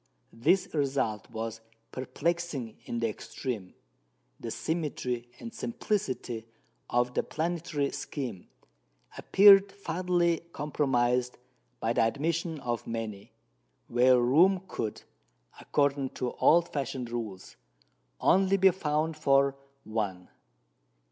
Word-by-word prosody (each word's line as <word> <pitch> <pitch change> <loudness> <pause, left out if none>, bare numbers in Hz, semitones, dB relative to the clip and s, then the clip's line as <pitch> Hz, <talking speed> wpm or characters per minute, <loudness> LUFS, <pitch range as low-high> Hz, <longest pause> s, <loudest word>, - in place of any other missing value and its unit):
This 165 +12 +2
result 135 -8 -1
was 115 -1 -5 0.3
perplexing 145 -2 -2
in 120 - -3
the 115 - +2
extreme. 110 -2 -5 0.6
The 115 - -5
symmetry 125 -5 -3
and 235 - -8
simplicity 130 - -3 0.4
of 120 0 +1
the - - +2
planetary 160 -3 -2
scheme 125 - -5 0.7
appeared 195 0 +7
fatally 175 -3 0
compromised 125 -4 0 0.4
by 115 - 0
the - - +2
admission 160 +7 0
of 120 -3 -3
many, 110 -3 -5 0.6
where 125 +1 +5
room 175 +10 +4
could, 110 - -4 0.6
according 140 -2 +1
to 125 -1 -1
old 170 +1 +3
fashioned 130 -4 -3
rules, 110 -6 -6 0.6
only 195 +1 +4
be 190 0 +6
found 155 -2 -1
for 140 -2 +3 0.3
one. 100 -5 -3
135 Hz, 100 wpm, -29 LUFS, 120-170 Hz, 0.7 s, appeared